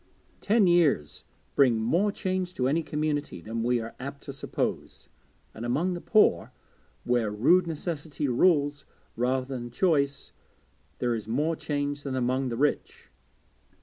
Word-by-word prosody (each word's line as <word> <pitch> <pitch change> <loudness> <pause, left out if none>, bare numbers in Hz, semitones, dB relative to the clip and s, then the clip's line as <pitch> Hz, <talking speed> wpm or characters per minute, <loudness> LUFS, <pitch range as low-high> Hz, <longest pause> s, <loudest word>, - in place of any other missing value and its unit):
Ten 215 0 +3
years 170 - +2 0.3
bring 130 -5 +4
more 170 - +2
change 185 -2 -3
to 125 - 0
any 155 +5 +1
community 150 - -2
than 115 +6 -4
we 120 +1 +1
are 115 0 -6
apt 140 +2 -7
to 140 - -7
suppose; 135 - -4 0.4
and 110 - -8
among 150 +10 0
the 175 - -5
poor, 210 - +3 0.5
where 120 -3 +1
rude 155 - +3
necessity 155 -2 -3
rules 145 +1 +2 0.3
rather 130 +2 0
than 125 -2 -6
choice, 140 -1 0 0.7
there 120 -1 0
is 110 -2 -4
more 150 +8 0
change 145 -1 -3
than 135 -2 -4
among 130 +1 0
the 115 - -4
rich. 145 +3 -1
140 Hz, 145 wpm, -27 LUFS, 120-160 Hz, 0.7 s, bring